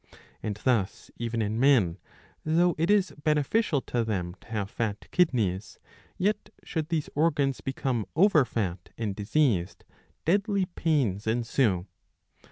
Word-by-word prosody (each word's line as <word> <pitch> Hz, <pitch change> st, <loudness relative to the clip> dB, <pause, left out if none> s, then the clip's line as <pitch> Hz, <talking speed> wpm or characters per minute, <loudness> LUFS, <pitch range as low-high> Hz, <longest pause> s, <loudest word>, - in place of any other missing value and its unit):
And 105 Hz, -, -3 dB
thus 115 Hz, -7 st, 0 dB
even 115 Hz, -1 st, -1 dB
in 110 Hz, +2 st, -2 dB
men, 120 Hz, -11 st, +4 dB, 0.4 s
though 170 Hz, +3 st, +3 dB
it 165 Hz, -, +1 dB
is 205 Hz, -2 st, +3 dB
beneficial 150 Hz, +2 st, +2 dB
to 120 Hz, -2 st, -1 dB
them 95 Hz, -6 st, -2 dB
to -, -, -19 dB
have 105 Hz, -3 st, -3 dB
fat 110 Hz, -5 st, -3 dB
kidneys, 115 Hz, -, +1 dB, 0.4 s
yet 205 Hz, +3 st, 0 dB
should 160 Hz, -2 st, -3 dB
these 160 Hz, -3 st, -1 dB
organs 145 Hz, -3 st, +1 dB
become 130 Hz, -4 st, -2 dB
over 165 Hz, -3 st, +5 dB
fat 95 Hz, -8 st, -3 dB
and 105 Hz, -4 st, -2 dB
diseased, 105 Hz, -, 0 dB, 0.4 s
deadly 200 Hz, +3 st, +2 dB
pains 135 Hz, -, 0 dB
ensue. 115 Hz, -5 st, +1 dB
130 Hz, 130 wpm, -28 LUFS, 105-160 Hz, 0.4 s, over